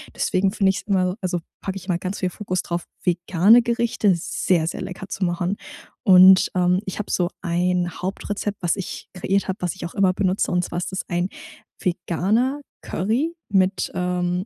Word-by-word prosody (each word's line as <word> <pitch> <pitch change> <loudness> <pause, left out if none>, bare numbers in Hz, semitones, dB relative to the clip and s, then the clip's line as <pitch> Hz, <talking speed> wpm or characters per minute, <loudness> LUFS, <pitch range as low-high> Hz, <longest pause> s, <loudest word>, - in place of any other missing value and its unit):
Deswegen 190 +1 +1
find 195 -1 +2
ich's - - -4
immer 185 -2 +1
also, 180 -1 -1 0.2
packe 195 0 -4
ich 190 0 -10
mal 175 -2 0
ganz 185 +2 -4
viel 185 -1 -1
Fokus 185 -2 -3
drauf, 170 -1 -3 0.2
vegane 180 +6 +4
Gerichte 235 -3 +1
sehr, 170 0 0
sehr - - -4
lecker 190 +1 -7
zu 190 - -4
machen. 175 +2 0 0.5
Und, 190 -3 +8
ähm, 180 0 +3
ich 190 - -4
habe 210 - -4
so 175 -1 +1
1 180 0 0
Hauptrezept, 205 +2 -3
was 170 - +2
ich 195 -3 -6
kreiert 195 +2 0
habe, 190 +2 -2
was 180 0 -2
ich 190 - -6
auch 170 - -7
immer 195 -2 +3
benutze 190 0 0
und 180 0 +1
zwar - - -4
ist 180 - -4
das 190 - -2
ein 175 +1 0 0.5
veganer 195 - 0 0.2
Curry 245 - -1
mit, 190 -1 +1
ähm, 180 0 -1
185 Hz, 185 wpm, -22 LUFS, 180-195 Hz, 0.5 s, Und